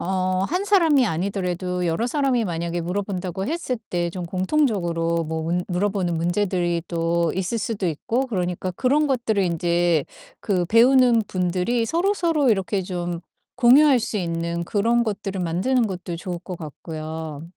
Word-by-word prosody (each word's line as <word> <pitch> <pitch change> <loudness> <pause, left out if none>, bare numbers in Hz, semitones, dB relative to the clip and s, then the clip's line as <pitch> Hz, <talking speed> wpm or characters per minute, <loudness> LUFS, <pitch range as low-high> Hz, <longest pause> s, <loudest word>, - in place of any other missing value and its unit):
어 185 0 0
1 365 +4 -1
사람이 325 - +4
아니더라도 180 0 -2
여러 170 +8 0
사람이 265 -4 +1
만약에 170 -1 -2
물어본다고 190 +1 -3
했을 310 -7 -2
때 175 -1 -1
좀 180 -1 -5
공통적으로 180 - 0
뭐 160 0 -3
문 175 +2 -1
물어보는 180 -2 0
문제들이 175 -1 0
또 170 -1 0
있을 190 +5 -1
수도 220 -4 -2
있고 230 - -1
그러니까 180 -4 -2
그런 275 +9 +2
것들을 235 -6 0
인제 170 -2 +1 0.4
그 185 -5 0
배우는 240 +1 +5
분들이 185 +6 0
서로서로 335 - +1
이렇게 195 -1 0
좀 175 -2 -4 0.4
공유할 260 +2 +6
수 220 -1 -3
있는 170 -1 -2
그런 230 +6 +1
것들을 195 -3 -3
만드는 200 +9 +1
것도 180 -3 -5
좋을 175 0 -5
것 180 -1 -7
같고요. 155 -1 -7
185 Hz, 330 characters per minute, -23 LUFS, 170-235 Hz, 0.4 s, 공유할